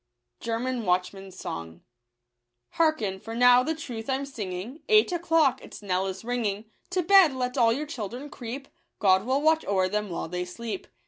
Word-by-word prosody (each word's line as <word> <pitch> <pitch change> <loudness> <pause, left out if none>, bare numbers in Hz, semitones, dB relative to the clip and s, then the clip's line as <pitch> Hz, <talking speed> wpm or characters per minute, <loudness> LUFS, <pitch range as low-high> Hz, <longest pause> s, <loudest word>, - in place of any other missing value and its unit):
WCHJ^r 195 - -3 0.9
Hearken, 235 -13 +1
for 225 +3 -7
now 245 +1 +6
the 315 +5 -1
truth 250 -7 -7
I'm 265 +1 0
singing, 220 - -6
Eight 430 -2 +5
o'clock 325 -6 +2
its - - -11
knell 190 -1 0
is 190 +3 -6
ringing; 225 -4 -2 0.2
To 365 0 0
bed 375 -4 +6
let 250 0 -2
all 235 -4 +4
your 285 +6 -1
children 260 0 -6
creep 255 +3 -7 0.2
— - - -49
God 190 +1 +3
will 270 +3 +1
watch 320 0 +3
o'er 190 -2 +2
them 210 +1 -2
while 170 -2 -4
they 180 +2 -3
sleep. 200 +3 -6
235 Hz, 160 wpm, -27 LUFS, 195-280 Hz, 0.9 s, now